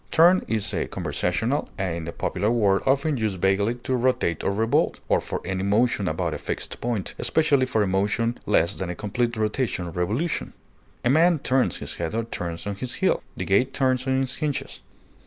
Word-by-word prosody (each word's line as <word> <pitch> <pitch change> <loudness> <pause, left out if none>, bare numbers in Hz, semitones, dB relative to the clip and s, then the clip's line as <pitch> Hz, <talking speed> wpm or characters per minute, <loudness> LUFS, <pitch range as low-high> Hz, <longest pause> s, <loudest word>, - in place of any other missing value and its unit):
Turn 175 +3 +5
is 110 -3 -1
a - - -1
conversational 110 +11 -1
and 85 -4 -3
popular 100 +4 0
word 105 -5 +3
often 140 +2 +2
used 105 -5 -1
vaguely 100 +5 +2
for 130 -1 0
rotate 120 -10 +1
or - - +1
revolve, 110 +3 +1
or - - +3
for - - -4
any 95 0 -2
motion 105 0 +2
about 80 - -1
a - - -4
fixed - - -5
point, 115 -5 -2
especially 140 -5 +2
for 110 -4 +1
a - - 0
motion 105 +5 0
less 95 -2 +3
than 95 -2 -4
a 90 - -3
complete 115 +4 -1
"rotation" 110 -3 -1
or 85 - -6
"revolution;" 110 - -1 0.5
a - - +4
man 165 +3 +5
turns 130 -2 +1
his - - -7
head 80 - -3
or 115 - 0
turns 85 -6 -5
on 100 -1 -3
his 125 +2 -4
heel; - - +1 0.2
the - - -3
gate 125 +7 +2
turns 130 -1 +1
on 130 0 +2
its 130 0 -2
hinges. 150 -3 -3
110 Hz, 195 wpm, -25 LUFS, 95-130 Hz, 0.5 s, Turn